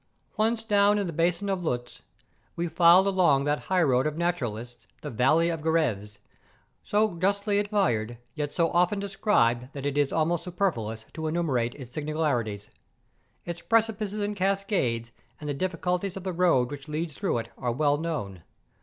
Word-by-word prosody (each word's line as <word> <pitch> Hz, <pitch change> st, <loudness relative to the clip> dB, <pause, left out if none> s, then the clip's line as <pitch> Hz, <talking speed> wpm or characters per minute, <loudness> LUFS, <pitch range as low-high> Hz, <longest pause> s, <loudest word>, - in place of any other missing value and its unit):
Once 225 Hz, +1 st, +1 dB
down 205 Hz, -1 st, +4 dB
in 200 Hz, -, 0 dB
the 170 Hz, -, -4 dB
basin 170 Hz, +5 st, 0 dB
of 190 Hz, -2 st, -1 dB
Luz, 120 Hz, -6 st, -3 dB, 0.5 s
we 170 Hz, +1 st, -1 dB
filed 170 Hz, +3 st, +6 dB
along 180 Hz, -8 st, +3 dB
that 145 Hz, +1 st, 0 dB
highroad 155 Hz, -8 st, +3 dB
of 155 Hz, 0 st, -4 dB
naturalists, 120 Hz, -9 st, -3 dB
the -, -, -6 dB
Valley 155 Hz, +9 st, +3 dB
of 165 Hz, -2 st, -3 dB
Gevres, 120 Hz, -11 st, 0 dB, 0.7 s
so 210 Hz, -3 st, +1 dB
justly 200 Hz, +2 st, +1 dB
admired, 170 Hz, -, 0 dB, 0.2 s
yet 150 Hz, -2 st, -3 dB
so 165 Hz, -1 st, +1 dB
often 180 Hz, +3 st, +2 dB
described 195 Hz, -, +1 dB
that 140 Hz, -1 st, -6 dB
it 145 Hz, 0 st, 0 dB
is 145 Hz, -1 st, +2 dB
almost 165 Hz, +1 st, 0 dB
superfluous 120 Hz, -, -2 dB
to 160 Hz, -1 st, -4 dB
enumerate 145 Hz, -8 st, 0 dB
its 130 Hz, -4 st, -10 dB
singularities. 140 Hz, -10 st, -2 dB, 0.7 s
Its 170 Hz, 0 st, -5 dB
precipices 215 Hz, -2 st, 0 dB
and 205 Hz, 0 st, -2 dB
cascades, 190 Hz, -, 0 dB, 0.3 s
and 150 Hz, -, -7 dB
the 145 Hz, -, -1 dB
difficulty 180 Hz, +4 st, -1 dB
of 195 Hz, -1 st, -7 dB
the 185 Hz, -1 st, -3 dB
road 165 Hz, -8 st, +2 dB
which 140 Hz, -2 st, -8 dB
leads 155 Hz, +1 st, -3 dB
through 190 Hz, -, -1 dB
it 115 Hz, 0 st, -4 dB
are 120 Hz, -, -2 dB
well 145 Hz, +3 st, +2 dB
known. 135 Hz, -, -4 dB
165 Hz, 165 wpm, -27 LUFS, 130-190 Hz, 0.7 s, filed